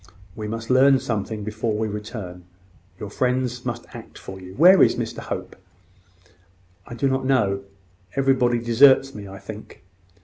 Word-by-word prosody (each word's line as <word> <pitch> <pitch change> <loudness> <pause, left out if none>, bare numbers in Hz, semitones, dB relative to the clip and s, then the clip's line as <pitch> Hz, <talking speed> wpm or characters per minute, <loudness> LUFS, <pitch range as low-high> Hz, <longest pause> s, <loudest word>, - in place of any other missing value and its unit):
We 105 -1 -5
must 115 +2 -5
learn 135 +1 +6
something 110 -2 -3
before 110 +1 -3
we 110 0 -1
return. 105 -4 -7 0.5
Your 105 - -7
friends 125 0 -1
must - - -4
act - - -11
for 95 0 -10
you. 95 +1 -11
Where 180 +6 +7
is - - +5
Mr - - -4
Hope?" - - -6 1.3
"I 120 - -8
do 130 +4 0
not 130 0 0
know. 100 -7 +1 0.5
Everybody 130 -3 +2
deserts 130 +3 +4
me, 105 -1 -9
I 95 0 -10
think." 105 -2 -11
115 Hz, 150 wpm, -23 LUFS, 105-130 Hz, 1.3 s, Where